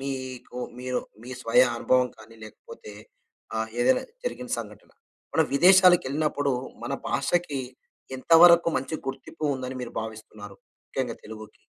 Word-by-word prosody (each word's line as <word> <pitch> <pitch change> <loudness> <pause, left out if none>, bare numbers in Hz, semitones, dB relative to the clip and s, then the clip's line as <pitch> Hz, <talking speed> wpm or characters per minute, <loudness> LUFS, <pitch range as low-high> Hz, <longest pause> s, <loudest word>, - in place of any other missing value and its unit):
మీకు 130 -2 -6 0.2
మీరు, 125 0 -2 0.2
మీ 125 - -10
స్వయ 120 +1 +4
అనుభవం 125 +1 +2
కానీ 115 +1 -15
లేకపోతే, 465 - -12 0.6
ఆహ్, 110 0 -2
ఏదైనా 255 - +3 0.2
జరిగిన - - -5
సంఘటన, - - -10 0.4
మనం 160 -1 +3
విదేశాలకెళ్ళినప్పుడు, 155 -5 +4 0.3
మన - - -4 0.2
భాషకి 170 -6 0 0.6
ఎంత 130 - -4
వరకు 170 -1 +7
మంచి 135 +4 -3
గుర్తింపు 135 +4 -6
ఉందని 130 0 -5
మీరు 120 - -7
భావిస్తున్నారు? 110 -2 -10 0.3
ముఖ్యంగా 125 -4 -3
తెలుగుకి. 110 -1 -11
130 Hz, 125 wpm, -26 LUFS, 115-155 Hz, 0.6 s, వరకు